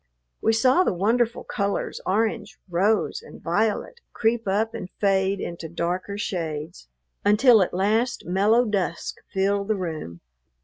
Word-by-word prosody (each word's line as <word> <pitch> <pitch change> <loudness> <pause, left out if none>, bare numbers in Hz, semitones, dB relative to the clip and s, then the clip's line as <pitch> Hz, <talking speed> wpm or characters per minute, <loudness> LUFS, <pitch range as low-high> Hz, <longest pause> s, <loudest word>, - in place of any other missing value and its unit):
We 225 - +3
saw 255 +10 +4
the 195 - 0
wonderful 230 +5 +1
colors 200 0 -2
orange, 210 0 0
rose, 195 +4 +1
and - - -13
violet 215 - -1
creep 225 -1 0
up 215 +4 +1
and 205 -5 -6
fade 195 -1 +2
into 170 -3 -6
darker 180 +4 -3
shades, 165 - -4 0.4
until 220 +2 +6
at 185 - +1
last 215 +7 0
mellow 205 +7 +3
dusk 195 -6 -2
filled 200 +1 0
the 215 - +1
room. 160 - -5
200 Hz, 135 wpm, -24 LUFS, 180-225 Hz, 0.4 s, until